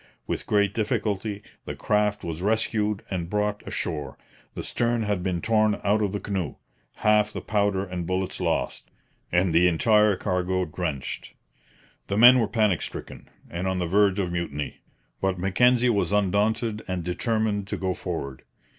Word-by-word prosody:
With -, -, -4 dB
great 100 Hz, -1 st, +2 dB
difficulty 105 Hz, -1 st, -2 dB, 0.2 s
the -, -, -5 dB
craft 105 Hz, 0 st, 0 dB
was 85 Hz, 0 st, -4 dB
rescued 105 Hz, 0 st, 0 dB
and 85 Hz, -3 st, -3 dB
brought 105 Hz, 0 st, -1 dB
ashore. 75 Hz, -3 st, -4 dB, 0.4 s
The -, -, -4 dB
stern 120 Hz, -1 st, 0 dB
had 105 Hz, -3 st, -1 dB
been 90 Hz, -2 st, -1 dB
torn 110 Hz, -2 st, +2 dB
out 105 Hz, +2 st, +2 dB
of 100 Hz, -2 st, 0 dB
the 100 Hz, -, -3 dB
canoe, 95 Hz, -8 st, -3 dB, 0.4 s
half 105 Hz, 0 st, +3 dB
the -, -, -5 dB
powder 100 Hz, -2 st, 0 dB
and 90 Hz, -3 st, -5 dB
bullets 95 Hz, 0 st, -2 dB
lost, -, -, -1 dB, 0.4 s
and 90 Hz, -1 st, +2 dB
the 85 Hz, +2 st, +5 dB
entire 105 Hz, +4 st, +4 dB
cargo 90 Hz, 0 st, -1 dB
drenched. 80 Hz, -4 st, -4 dB, 0.7 s
The 100 Hz, -, -1 dB
men 125 Hz, +3 st, +9 dB
were 115 Hz, -, +2 dB
panic 105 Hz, -5 st, +1 dB
stricken -, -, -7 dB, 0.2 s
and 90 Hz, +2 st, -4 dB
on 95 Hz, 0 st, 0 dB
the 90 Hz, -, -1 dB
verge 100 Hz, +2 st, +3 dB
of 90 Hz, -3 st, -1 dB
mutiny; 80 Hz, -4 st, -4 dB, 0.4 s
but 95 Hz, -1 st, 0 dB
Mackenzie 125 Hz, +7 st, +3 dB
was 100 Hz, -2 st, 0 dB
undaunted 105 Hz, +2 st, +1 dB
and 90 Hz, -2 st, -3 dB
determined 105 Hz, +3 st, -1 dB
to -, -, -3 dB
go 95 Hz, -1 st, -1 dB
forward. 70 Hz, -8 st, -5 dB
100 Hz, 160 wpm, -25 LUFS, 90-105 Hz, 0.7 s, men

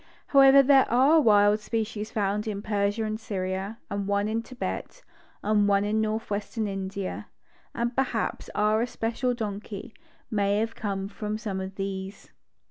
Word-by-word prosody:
However, 275 Hz, 0 st, +7 dB
there 270 Hz, 0 st, +5 dB
are 275 Hz, +7 st, +5 dB
wild 210 Hz, -3 st, +5 dB
species 215 Hz, -1 st, -3 dB
found 210 Hz, 0 st, -1 dB
in 205 Hz, -1 st, -3 dB
Persia 205 Hz, +1 st, 0 dB
and 215 Hz, 0 st, -3 dB
Syria, 195 Hz, 0 st, -3 dB
and 200 Hz, -1 st, -3 dB
one 200 Hz, 0 st, +1 dB
in 225 Hz, +1 st, -1 dB
Thibet, 255 Hz, -, -6 dB, 0.4 s
and 210 Hz, -1 st, +3 dB
one 200 Hz, 0 st, +3 dB
in 215 Hz, +1 st, +1 dB
northwestern 215 Hz, 0 st, -2 dB
India, 195 Hz, 0 st, -4 dB, 0.5 s
and 235 Hz, +1 st, -1 dB
perhaps 255 Hz, -4 st, -1 dB
our 215 Hz, +1 st, +2 dB
especial 240 Hz, +1 st, -1 dB
donkey 215 Hz, 0 st, -6 dB, 0.4 s
may 200 Hz, -1 st, +1 dB
have 225 Hz, +1 st, -1 dB
come 195 Hz, -2 st, -3 dB
from 210 Hz, +1 st, -4 dB
some 200 Hz, -4 st, -4 dB
of 190 Hz, +1 st, -6 dB
these. 195 Hz, 0 st, -5 dB
210 Hz, 145 wpm, -27 LUFS, 200-225 Hz, 0.5 s, However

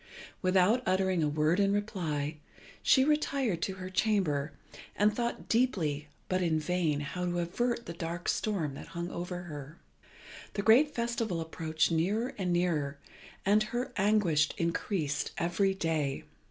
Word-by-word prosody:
Without 185 Hz, +6 st, +4 dB
uttering 185 Hz, -1 st, +2 dB
a 150 Hz, -, +2 dB
word 155 Hz, +4 st, +2 dB
in 200 Hz, 0 st, +3 dB
reply, 165 Hz, -8 st, -2 dB, 0.4 s
she 265 Hz, -, +5 dB
retired 275 Hz, -, +1 dB
to 190 Hz, -, -2 dB
her 185 Hz, 0 st, -7 dB
chamber, 180 Hz, -9 st, +1 dB, 0.4 s
and 210 Hz, +1 st, +3 dB
thought 235 Hz, 0 st, -2 dB
deeply 170 Hz, -, +1 dB, 0.2 s
but 185 Hz, 0 st, 0 dB
in 165 Hz, -3 st, +2 dB
vain 155 Hz, -3 st, 0 dB
how 180 Hz, +5 st, -4 dB
to 175 Hz, 0 st, -1 dB
avert 235 Hz, +8 st, -1 dB
the 170 Hz, -, -6 dB
dark 170 Hz, +1 st, -5 dB
storm 180 Hz, -10 st, 0 dB
that -, -, -9 dB
hung 170 Hz, +1 st, -3 dB
over 175 Hz, +1 st, -4 dB
her. 150 Hz, -2 st, -8 dB, 0.8 s
The 200 Hz, -, -2 dB
great 265 Hz, +8 st, +5 dB
festival 235 Hz, -6 st, -1 dB
approached 160 Hz, 0 st, -1 dB
nearer 200 Hz, +9 st, 0 dB
and 180 Hz, -2 st, 0 dB
nearer, 160 Hz, -5 st, 0 dB, 0.5 s
and 205 Hz, +2 st, +5 dB
her 240 Hz, +4 st, -2 dB
anguish 190 Hz, -7 st, +3 dB
increased 165 Hz, -2 st, -1 dB
every 190 Hz, +3 st, +1 dB
day. 155 Hz, -6 st, -1 dB
180 Hz, 145 wpm, -31 LUFS, 160-210 Hz, 0.8 s, she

